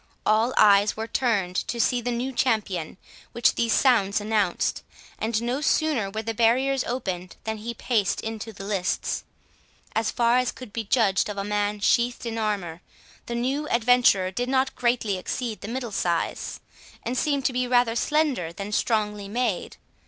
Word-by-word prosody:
All 220 +3 +3
eyes 205 0 +5
were 220 - -2
turned 205 -7 0
to 235 - -3
see 245 +1 +2
the 245 - -2
new 245 +2 -2
champion 205 -10 -1 0.4
which 235 - +3
these 230 -1 +1
sounds 215 -7 +3
announced, 210 -3 0 0.4
and 220 0 0
no 250 +4 -1
sooner 300 -9 +1
were 220 +3 -4
the 225 +1 -3
barriers 250 +4 +2
opened 185 -7 -4
than 220 0 -3
he 235 +2 -6
paced 215 -3 0
into 225 0 -5
the 195 -2 -10
lists. 195 -2 -1 0.7
As 220 0 0
far 240 +1 +3
as 250 - 0
could 250 -5 -11
be 225 -1 -3
judged 210 -3 +2
of 205 - -5
a 195 - -1
man 205 0 -1
sheathed 240 +3 +2
in 230 -1 -3
armour, 195 -6 -2 0.5
the 235 - -3
new 270 +5 -1
adventurer 235 -6 +4
did 245 +6 -2
not 265 0 +1
greatly 235 -5 0
exceed 230 +3 -4
the - - -6
middle 240 0 -4
size, 170 -4 -2 0.4
and 245 - -2
seemed 280 -1 0
to 260 - +2
be 250 0 0
rather 245 -2 +3
slender 275 - +1
than 200 +4 -6
strongly 210 -2 0
made. 225 -2 -2
225 Hz, 170 wpm, -25 LUFS, 205-245 Hz, 0.7 s, eyes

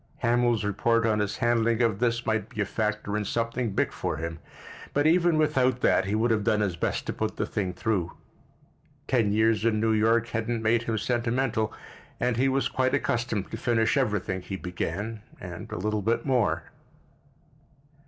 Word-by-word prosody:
Hamil's 120 -1 +2
report 115 +3 +1
on 110 -1 +2
his 105 +1 -1
handling 115 -2 +2
of 110 -4 +1
this 120 0 0
might 110 -1 -1
be 115 - -10
a 105 - +2
factor 105 0 -2
in 105 - 0
something 115 +3 -1
big - - +1
for - - -3
him, 80 0 -5 0.6
but 145 +1 +2
even 170 0 +4
without 130 -5 +2
that 95 - +3
he 100 +2 -1
would 115 +2 +2
have 105 -2 +1
done 105 -1 +2
his 95 -4 0
best - - -2
to - - -3
put - - -3
the - - 0
thing 95 -3 -2
through. 90 -2 -1 1.0
Ten 115 -6 +2
years 110 0 +2
in 110 -2 +2
New 110 0 +2
York 115 +2 +2
hadn't 115 0 -2
made 115 +1 +3
him 115 -1 -2
sentimental 120 0 0 0.5
and 125 0 +1
he 130 +3 +2
was 135 +1 +1
quite 130 0 +1
accustomed 115 -4 -1
to 110 - -4
finish 115 0 +1
everything 105 -8 0
he 95 - -6
began—and 95 +4 -6
a - - -4
little 105 +3 -1
bit 115 +4 0
more. 130 -5 +1
115 Hz, 180 wpm, -27 LUFS, 105-120 Hz, 1.0 s, even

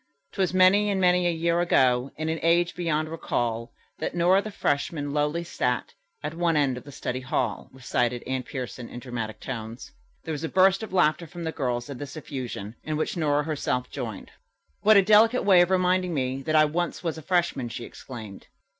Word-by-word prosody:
"'Twas 190 -2 0
many 185 +3 +5
and 195 -1 0
many 180 -1 +3
a - - +2
year 170 +1 +1
ago, 130 -6 +3
In 155 +1 -3
an 160 0 -1
age 170 +1 +3
beyond 155 -3 -1
recall, 120 -7 -2 0.3
That - - -3
Nora, 180 +3 +4
the 215 - -6
freshman, 145 -5 -1
lowly 150 +3 0
sat 125 -7 -2 0.3
At 150 +1 -3
one 165 -1 +1
end 140 -3 +2
of 125 - -9
the 145 - -10
study 130 -1 -4
hall." 125 -4 -2
recited 125 -2 -1
Anne 130 0 -2
Pierson 125 -2 -6
in 120 - -7
dramatic 115 -4 -5
tones. 115 -2 -7 0.3
There 160 - -5
was 155 0 -4
a 160 - -2
burst 190 +1 +4
of 220 - -6
laughter 170 -2 +2
from 170 +2 -8
the 160 - -2
girls 125 -5 -2
at 140 -3 -7
this 145 +1 -7
effusion, 125 -8 -6
in 155 -1 -2
which 155 - -2
Nora 150 -3 +1
herself 140 -4 -2
joined. - - -6 0.5
"What 215 0 +6
a 200 - +6
delicate 220 +5 +5
way 190 -3 +6
of 175 - +3
reminding 185 -1 +2
me 130 0 -1
that 155 - +1
I 155 0 +7
once 170 +4 -2
was 165 -2 -2
a - - -10
freshman!" 170 -7 0
she 120 0 -6
exclaimed. 110 -6 -10
155 Hz, 200 wpm, -26 LUFS, 130-175 Hz, 0.5 s, I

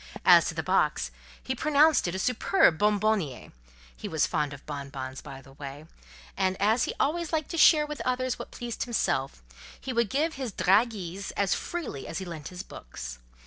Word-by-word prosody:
As - - +7
to - - -4
the - - -2
box, - - +1 0.3
he 260 - -2
pronounced 300 - +4
it 175 - -3
a - - -1
superb 240 - +3
bonbonnière—he 130 - -2
was 160 -2 +1
fond 150 -4 -1
of 140 -1 -10
bonbons, 140 -2 -6
by 135 -1 -10
the 135 - -16
way—and 140 - -6
as 220 +5 +3
he - - -3
always 330 +3 0
liked 315 -3 -1
to 335 - -3
share 300 -1 +7
with 300 -1 -6
others 255 0 -1
what - - -7
pleased 240 0 -5
himself, 170 - -1 0.4
he 265 - -5
would 235 -3 +1
give 310 - 0
his 260 -7 -5
"dragées" 195 -2 +1
as 195 -1 +2
freely 305 - -4
as 165 - -5
he 190 - -4
lent 160 -5 -7
his 180 0 -7
books. - - -9
190 Hz, 180 wpm, -28 LUFS, -, 0.4 s, As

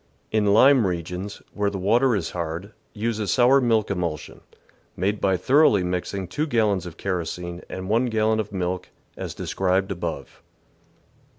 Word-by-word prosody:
In 105 -1 +2
lime 120 +2 +6
regions, 90 +3 -5
where 105 -1 0
the 100 - -5
water 115 +6 +3
is 90 -5 -2
hard, 85 +4 -5 0.2
use 110 +1 -2
a 105 - -2
sour 130 +4 +4
milk 115 -4 +2
emulsion, 85 -5 -4 0.6
made 100 +2 -1
by 95 -1 +2
thoroughly 130 - +4
mixing 90 +1 -3
2 150 - -2
gallons 105 - +1
of 85 -1 -10
kerosene 90 -1 -4
and 95 0 -6
1 115 +5 +2
gal 110 -2 +1
lon 110 0 +2
of 105 -1 -3
milk, 90 -1 -3 0.3
as - - -6
described 95 +1 0
above. 90 -3 -5
100 Hz, 160 wpm, -24 LUFS, 90-110 Hz, 0.6 s, lime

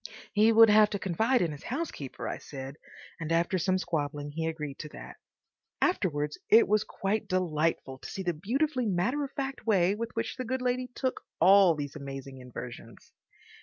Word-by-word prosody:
He 215 +2 +5
would 225 -1 +8
have 210 0 +6
to 205 - -2
confide 220 +6 +1
in 165 - -1
his 145 0 -8
housekeeper, 255 - -4
I - - -4
said; 135 0 -8 0.4
and 165 -1 -4
after 170 +3 +2
some 185 +2 +2
squabbling 145 -4 -3
he 160 +2 -2
agreed 150 -4 -5
to 155 - -6
that. - - -10 0.6
(Afterwards 150 - 0
it 225 +2 +7
was 210 0 +3
quite 200 +2 -2
delightful 165 -6 -1
to - - -9
see 195 - -5
the 175 -1 0
beautifully 255 - 0
matter 210 +10 0
of 275 - -5
fact 270 -3 -5
way 190 -3 +4
with 230 +2 -4
which 230 - -3
the 255 - -3
good 255 +1 -2
lady 250 0 0
took 260 -1 -2 0.2
all 190 -3 +7
these 145 -1 -5
amazing 135 -2 -7
inversions.) 120 -2 -10
185 Hz, 180 wpm, -29 LUFS, 150-225 Hz, 0.6 s, would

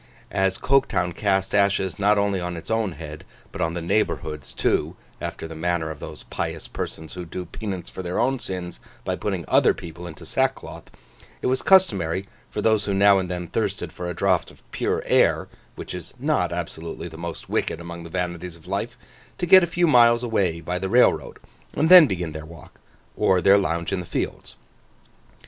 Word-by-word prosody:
As 95 -1 +1
Coketown 110 -10 +1
cast 95 -1 0
ashes 100 -4 +2
not 105 +1 +4
only 100 -1 +1
on 90 -1 -4
its 80 - -8
own 110 -5 0
head 75 -2 -9 0.3
but - - -6
on 85 +1 0
the 85 - -4
neighbourhood's 80 - -1
too—after - - -3
the 80 - -8
manner 80 -1 -1
of 75 - -9
those - - -8
pious - - -4
persons 80 0 -6
who 90 - -6
do 90 +2 -6
penance 95 0 -6
for - - -6
their 90 0 -3
own 130 +3 +1
sins 90 -5 -5 0.3
by - - -1
putting - - -3
other - - +4
people 85 +1 -9
into 80 -3 -10
sackcloth—it - - -5
was 130 +1 +1
customary 100 - +3 0.2
for - - -4
those 110 -2 +3
who 100 - -1
now 100 0 +6
and 95 -1 -3
then 90 -1 -3
thirsted 100 -3 -3
for 90 0 -5
a 90 - -4
draught 95 -1 +1
of - - -19
pure - - -1
air, - - +3 0.3
which - - -7
is - - -8
not - - 0
absolutely 80 +1 -5
the 80 - -11
most 85 0 -7
wicked - - -1
among 85 0 -8
the 85 - -9
vanities 90 0 -4
of 80 - -18
life, - - -3 0.4
to - - -1
get 185 +2 +8
a 175 - +1
few 175 +1 +1
miles 120 -5 +5
away 95 -8 0
by 90 +2 -3
the 95 0 -3
railroad, 125 +4 +3 0.4
and 160 - +2
then 180 -4 +10
begin 90 -5 -3
their 80 0 -7
walk, 80 +1 -14 0.4
or 95 - +3
their 95 +2 +6
lounge 85 -2 -1
in 95 - 0
the 90 - -6
fields. - - -4
90 Hz, 190 wpm, -24 LUFS, 85-100 Hz, 0.4 s, then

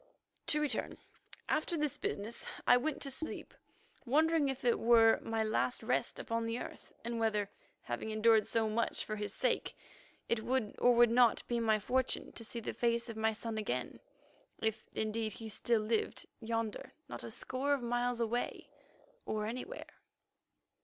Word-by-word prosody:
To 300 - +4
return. 290 -7 0 0.5
After 310 +2 0
this 300 -3 -1
business 215 +4 -3 0.2
I - - +7
went 285 +4 0
to 275 - 0
sleep, 290 +4 -4 0.5
wondering 305 +3 +3
if 265 -2 -4
it 240 - +3
were 225 -1 +6
my 225 -1 -1
last 220 +3 0
rest - - 0
upon 230 -1 -2
the 230 +1 -1
earth, - - -8
and 235 -1 -2
whether, 210 -3 +1 0.3
having 120 - -4
endured 220 0 +4
so 225 -1 +1
much 230 +2 0
for 215 - -3
his 210 -1 -3
sake, - - 0 0.5
it 235 -1 +1
would 250 -4 0
or 245 0 +5
would 240 -1 +6
not 240 -1 +4
be 240 -1 0
my 220 -2 +3
fortune 255 +5 0
to 230 - -6
see 235 +1 -3
the 225 - -4
face 235 0 0
of 230 - -5
my 220 0 +2
son 220 0 -4
again, 125 - -3 0.6
if, 220 0 -2
indeed, 220 0 -1
he 225 +1 -7
still 225 +1 +1
lived, 215 +1 -1
yonder 225 -1 -3
not - - -7
a - - -6
score 265 +2 -1
of 265 - -6
miles 245 0 0
away—or 235 - -4
anywhere. 255 - -6
230 Hz, 165 wpm, -34 LUFS, 220-245 Hz, 0.6 s, I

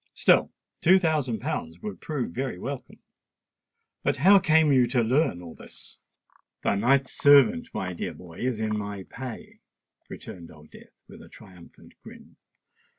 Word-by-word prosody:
Still - - +3 0.3
two 185 +3 +6
thousand 150 - -1
pounds 80 +1 -4
would 100 -4 -7
prove 145 - -4
very 130 -1 -4
welcome. 135 +7 -7 1.0
But - - 0
how 195 +8 +6
came 160 -3 +3
you 125 -2 +4
to 120 -1 +1
learn 120 - 0
all 85 -2 -10
this?" - - -15 0.6
"The - - +1
knight's 130 +6 +2
servant, 220 - +4
my 90 - -4
dear 85 - -5
boy, 85 -2 -13
is 125 -3 -2
in 110 -1 -1
my 100 -2 -5
pay," 125 -3 -9 0.5
returned 85 -2 -10
Old 75 -1 -17
Death, - - -18
with - - -14
a - - -15
triumphant 90 -3 -17
grin. - - -15
125 Hz, 150 wpm, -26 LUFS, 95-145 Hz, 1.0 s, two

